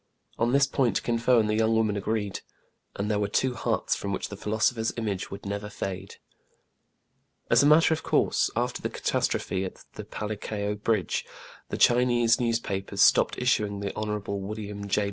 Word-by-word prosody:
On 120 +1 +2
this 140 +1 +5
point 125 -7 0
Kin 115 -1 0
Fo 125 +1 +4
and 110 -2 +3
the 105 - 0
young 110 0 +2
woman 110 -2 +2
agreed; 105 0 -2 0.6
and 100 - -2
there 105 -1 0
were 100 - 0
two 125 +5 +1
hearts 115 - -1
from 100 - -4
which - - -3
the 100 - -6
philosopher's 110 +2 0
image 105 -5 -3
would 100 - -9
never 100 +1 -4
fade. 95 -2 -6 1.4
As 115 +1 +6
a 140 - +4
matter 160 +2 +6
of 160 - -3
course, - - +2
after - - -1
the - - -2
catastrophe 95 0 -1
at 95 - -8
the - - -7
Palikao 105 -1 -4
bridge, 110 -4 0 0.5
the - - -3
Chinese 120 -1 +4
newspapers 100 -5 0
stopped - - +4
issuing 105 -5 +1
the 100 -1 -3
Hon. 105 0 -2 0.2
William 100 0 -6
J. 100 - +1
105 Hz, 175 wpm, -27 LUFS, 100-115 Hz, 1.4 s, As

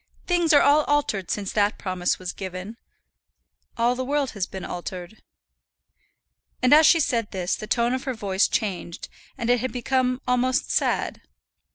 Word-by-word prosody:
Things 345 -2 +2
are 290 - +6
all 295 +2 +5
altered 250 -11 0
since 200 -2 -2
that 205 0 +1
promise 185 -2 -1
was 185 -1 -6
given, 190 +3 -7 1.0
all 235 +1 +2
the 255 +1 -3
world 280 0 -1
has 200 -3 -3
been 190 -2 -7
altered." 180 +3 -7 1.4
And 255 - +5
as 310 +1 +7
she 335 - +5
said 235 -8 0
this 185 -2 -2
the 215 - -8
tone 235 +2 +1
of 260 +1 -3
her 260 -2 -2
voice 200 -2 +1
was - - +3
changed, 185 -6 -6 0.3
and 235 -3 -3
it 245 - +3
had 255 +2 -3
become 255 0 0
almost 250 +1 +1
sad. - - 0
235 Hz, 170 wpm, -24 LUFS, 190-260 Hz, 1.4 s, as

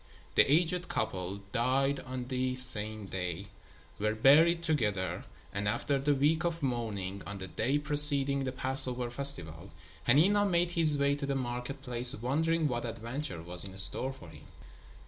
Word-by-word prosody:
The - - +4
aged 175 +3 +1
couple 100 -2 -3
died 135 +4 +1
on 130 -1 -6
the 130 0 -2
same 110 -4 0
day, 95 0 -5 0.5
were 105 +1 -1
buried 160 +8 +5
together 105 - -1 0.3
and 100 +1 -3
after 140 +7 -1
the 145 +1 +1
week 155 +5 +1
of 170 -2 -3
mourning, 105 -7 -3
on 100 0 -6
the 95 - -6
day 125 +10 -1
preceding 145 -2 +2
the 130 - -3
Passover 130 -2 +3
festival, 95 - 0 0.4
Hanina 195 +10 +4
made 175 -1 +1
his 160 -4 +3
way 140 0 +2
to 140 -1 -4
the 140 - -1
market 125 +2 -5
place 125 -1 0
wondering 155 +7 0
what 120 -3 -3
adventure 115 - -6
was 85 +1 -3
in 95 -1 -8
store 95 +7 +4
for 95 -11 -13
him. - - -15
130 Hz, 160 wpm, -30 LUFS, 105-145 Hz, 0.5 s, buried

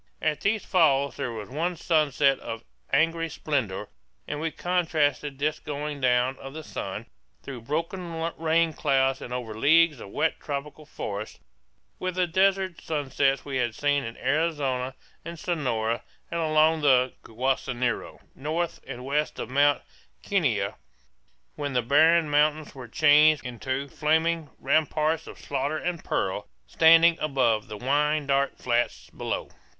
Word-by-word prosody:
At 155 -1 -1
these 215 +1 0
falls 140 -6 +3
there 120 - -3
was 110 -2 -7
one 165 +6 -2
sunset 150 -4 +2
of 115 0 -6 0.3
angry 165 +3 +2
splendor; 125 -11 -2 0.4
and 150 - -3
we 165 +1 -1
contrasted 155 -5 0
this 150 +2 -1
going 145 -1 -5
down 125 +1 +2
of 135 +2 -9
the 160 - -6
sun, - - -5 0.4
through 130 -4 -7
broken 165 +8 -3 0.3
rain 165 0 +2
clouds 135 -2 +1
and - - -8
over 125 -3 -4
leagues 150 +5 +4
of 100 - -9
wet 160 - 0
tropical 145 +1 -6
forest, 105 -6 -6 0.6
with 185 -1 -3
the 185 -1 +2
desert 190 0 +1
sunsets 140 -3 0
we 135 -2 -3
had 120 -3 -1
seen 145 -1 +1
in 115 +1 -7
Arizona 135 -3 0 0.3
and 170 +1 -7
Sonora, 120 -10 -1 0.3
and 170 - -1
along 155 0 +3
the 130 -3 +4
Guaso 130 +3 -1
Nyiro 120 -1 -2
north 160 +5 -3
and 125 +1 -7
west 150 +3 -1
of - - -5
Mount 145 +1 +3 0.4
Kenia, - - 0 0.8
when 145 -2 -4
the 125 -1 +1
barren 160 +6 +5
mountains 150 +1 +1
were 130 -3 -9
changed 150 +2 +5
into 130 +3 -3
flaming 160 +1 0
"ramparts 155 +2 +1
of - - -10
slaughter 145 +2 -2
and 175 0 -3
peril" - - -2 0.2
standing 165 - +6
above 125 -7 +1
"the 105 - -7
wine 150 +4 +1
dark 140 0 +1
flats 120 -1 -1
below." - - -4
145 Hz, 145 wpm, -26 LUFS, 130-160 Hz, 0.8 s, standing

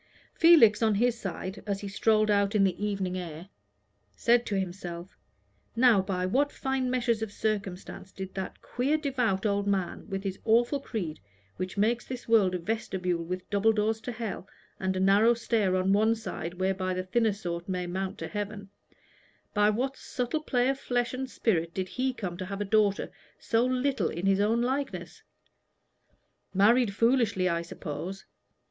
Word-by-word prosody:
Felix, 305 -12 +6
on 220 -2 +3
his 240 +3 +2
side, 190 0 -5
as 200 -1 -2
he 200 - -5
strolled 215 +1 +2
out 200 +1 +2
in 205 - +4
the 190 +1 0
evening 195 -3 -1
air, 170 +1 -8 0.7
said 240 0 +3
to 200 -2 0
himself: 175 -1 -6 0.6
"Now 235 -4 +5
by 185 -1 -2
what 275 +10 +1
fine 265 -1 -1
meshes 240 -3 +1
of 220 -2 -3
circumstance 195 -3 -4
did 190 -1 -7
that 190 -1 -6
queer 275 +5 0
devout 250 -10 0
old 200 -1 +1
man, 195 +1 -2
with 195 -1 -3
his 195 -1 -4
awful 235 +5 +3
creed, 185 - -4 0.4
which 185 +2 -4
makes 230 +4 +2
this 255 -1 -7
world 205 -5 +4
a - - +1
vestibule 180 -3 -2
with 180 +2 -5
double 205 +2 +4
doors 220 +1 0
to 245 - -5
hell, 220 -4 -5 0.3
and 190 0 -1
a - - 0
narrow 205 +5 +5
stair 220 -5 +1
on 185 +1 +2
one 220 +3 +3
side 180 -6 -6
whereby 185 0 -1
the 185 - -2
thinner 220 +4 +2
sort 175 -3 -5
may 180 -1 -1
mount 190 +2 -3
to 160 - -5
heaven 205 -1 -5 0.8
by 210 0 +4
what 255 +6 -1
subtle 250 +5 -3
play 250 -4 +1
of 270 0 -1
flesh 245 -2 -1
and 260 +1 -4
spirit 170 -10 0
did 185 -1 -2
he 260 +1 -1
come 185 -8 -5
to 185 - -4
have 200 +1 -5
a 205 - -1
daughter 205 -1 +2 0.3
so 230 +1 +1
little 255 - +1
in 170 +3 -4
his 195 0 +3
own 225 +3 +2
likeness? 270 +3 -3 1.3
Married 220 +3 +4
foolishly, 230 -5 +2
I 170 -2 0
suppose. 170 +3 -6
205 Hz, 175 wpm, -28 LUFS, 185-235 Hz, 1.3 s, Felix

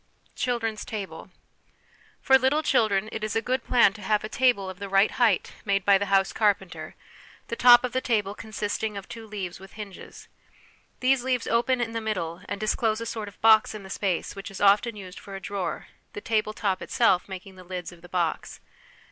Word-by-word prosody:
Children's 225 -3 -2
Table. 195 -5 -7 0.9
For 265 - +5
little 275 +5 +2
children 215 -6 +2
it 220 - -5
is 215 - -2
a - - +3
good 255 +3 -1
plan 235 -5 +4
to 215 - -12
have 210 +2 +1
a 215 - -5
table 240 -6 +2
of 185 0 -8
the 200 -1 -6
right 195 +2 +4
height 240 -3 +1
made 200 -2 0
by 200 -1 +5
the 200 - -2
house 195 -1 +2
carpenter, 195 -7 -1 0.5
the - - -2
top 245 0 +7
of 250 - -2
the 260 - -1
table 210 -5 0
consisting 215 0 -4
of 195 - -8
two 225 -1 -9
leaves 190 -5 -6
with 195 0 -14
hinges. 205 -3 -10 0.7
These 255 -1 +3
leaves 250 -2 0
open 240 +2 +1
in 235 -1 -1
the 230 0 -3
middle, 180 -6 -3
and 205 - -3
disclose 215 +1 0
a 230 - -5
sort 220 -2 -4
of 200 - -12
box 220 -1 +5
in 210 - -8
the 190 - -10
space 190 -4 -2
which 195 +1 -7
is 195 - -9
often 205 +3 +4
used 190 -2 -9
for 195 - -10
a - - -5
drawer, 195 -3 -4 0.3
the 415 - -5
table 215 - 0
top 195 -4 -1
itself 230 -8 +2
making 190 0 -8
the 185 - -12
lids 180 -1 -6
of 175 -1 -16
the 175 - -14
box. 175 -3 -2
210 Hz, 205 wpm, -26 LUFS, 195-230 Hz, 0.9 s, top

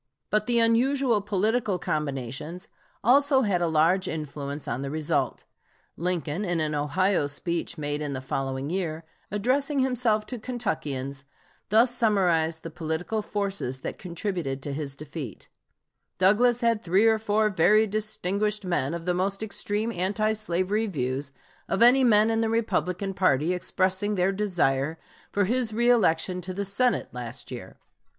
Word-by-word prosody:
But 215 0 +1
the 240 -1 +2
unusual 235 0 +3
political 210 +1 0
combinations 150 +2 -4 0.4
also 270 +3 +5
had 200 -7 +1
a 170 - +2
large 165 +4 +3
influence 145 -2 -5
on 120 +3 -2
the 140 - -3
result. 155 +1 -1 0.5
Lincoln, 175 0 -2
in 175 -4 0
an 155 -1 0
Ohio 150 +3 +1
speech 170 +4 -3
made 145 0 -2
in 145 -2 -3
the 130 - -3
following 135 +2 -3
year, 165 -4 -2 0.3
addressing 265 +8 0
himself 245 -5 +1
to 245 +1 -6
Kentuckians, 145 - -3 0.4
thus 230 +4 +5
summarized 175 -9 +2
the 165 - -6
political 165 +6 -2
forces 195 -12 -3
that - - -5
contributed 170 -7 -3
to 145 - -3
his 140 -2 -4
defeat: 145 - -8 0.7
"Douglas 230 +7 +4
had 230 -2 +2
three 190 +5 +3
or 220 -1 +4
four 215 0 +1
very 210 +4 +4
distinguished 210 -1 -1
men 170 -4 0
of 170 -1 -6
the 180 - +1
most 195 +3 -1
extreme 210 +1 -2
anti 210 +3 0
slavery 210 +1 0
views 135 -4 -3 0.4
of 195 - +3
any 255 +3 +6
men 220 -2 +5
in 225 0 +1
the 225 - +1
Republican 200 -4 -1
party 175 -3 +2
expressing 190 +3 0
their 185 +1 +2
desire 165 -7 0 0.3
for 200 -1 +2
his 240 +2 0
reëlection 195 -7 +2
to 185 +1 -6
the 200 +1 -2
Senate 240 +6 +1
last 120 -1 -6
year. - - -8
185 Hz, 150 wpm, -26 LUFS, 155-215 Hz, 0.7 s, any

